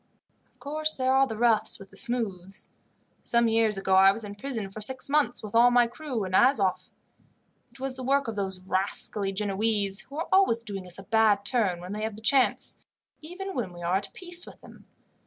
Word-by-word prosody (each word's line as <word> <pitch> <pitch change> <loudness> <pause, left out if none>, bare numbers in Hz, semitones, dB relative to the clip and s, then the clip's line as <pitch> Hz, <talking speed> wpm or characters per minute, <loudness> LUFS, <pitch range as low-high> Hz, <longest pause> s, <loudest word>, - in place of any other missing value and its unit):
"Of - - -37
course 310 +2 -2
there 260 0 +1
are 270 0 +4
the 220 - -6
roughs 220 -2 +2
with 195 -1 -14
the - - -17
smooths. 195 -6 -3 0.5
Some 235 0 +2
years 225 -2 +2
ago 190 0 -1
I 190 +1 +7
was 220 +3 -4
in 205 -1 -7
prison 220 -3 -5
for 215 - -8
six 260 +4 +1
months, 285 -7 +1
with 210 - -8
all 235 +2 +6
my 245 0 +4
crew, 245 -2 -5
in 185 - -5
Azoff. 205 -3 +2 0.8
It - - -19
was 265 0 -2
the 260 - -6
work 275 +1 +1
of 225 - -4
those 190 -2 -4
rascally 195 +1 0
Genoese, 200 0 0
who 280 - -10
are 330 - -3
always 375 -13 +3
doing 195 -4 -6
us 180 - -5
a 195 - -10
bad 210 -1 +2
turn 200 -9 +1
when 180 +3 -7
they 210 - -5
have 220 -1 -3
the 215 - -12
chance, 260 +3 +2 0.4
even 370 +5 -7
when 225 -8 -3
we 175 0 -10
are 175 +2 +1
at 200 0 -6
peace 350 -1 0
with - - -14
them. - - -16
220 Hz, 210 wpm, -27 LUFS, 195-260 Hz, 0.8 s, I